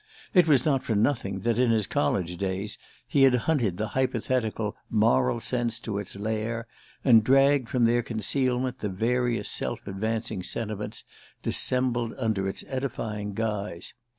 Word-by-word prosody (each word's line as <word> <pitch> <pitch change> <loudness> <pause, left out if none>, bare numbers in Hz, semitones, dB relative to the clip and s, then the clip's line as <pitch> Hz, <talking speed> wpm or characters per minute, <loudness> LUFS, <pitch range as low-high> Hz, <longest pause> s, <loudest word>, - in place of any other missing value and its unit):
It 180 -3 +6
was 140 -5 +4
not 140 -4 +2
for 110 - -2
nothing 100 -4 0
that, 115 +2 0
in 125 -1 +3
his 110 -3 +2
college 85 +3 0
days, 95 +2 -2 0.3
he 140 - +2
had 135 -2 +6
hunted 120 - +1
the 110 +2 -2
hypothetical 120 -4 -1
"moral 105 - +3
sense" 120 -1 -1
to 100 -3 -3
its 100 - -3
lair, 110 +2 -2 0.4
and 115 -4 +7
dragged 135 0 +4
from 125 -2 +2
their 120 +1 +3
concealment 125 +3 0
the 105 - -2
various 120 +5 0
self - - -1
advancing 110 0 -2
sentiments 105 +1 -3 0.4
dissembled 120 -2 0
under 110 -6 0
its - - -5
edifying 110 -6 -4
guise. 105 -5 -3
115 Hz, 150 wpm, -27 LUFS, 105-125 Hz, 0.4 s, and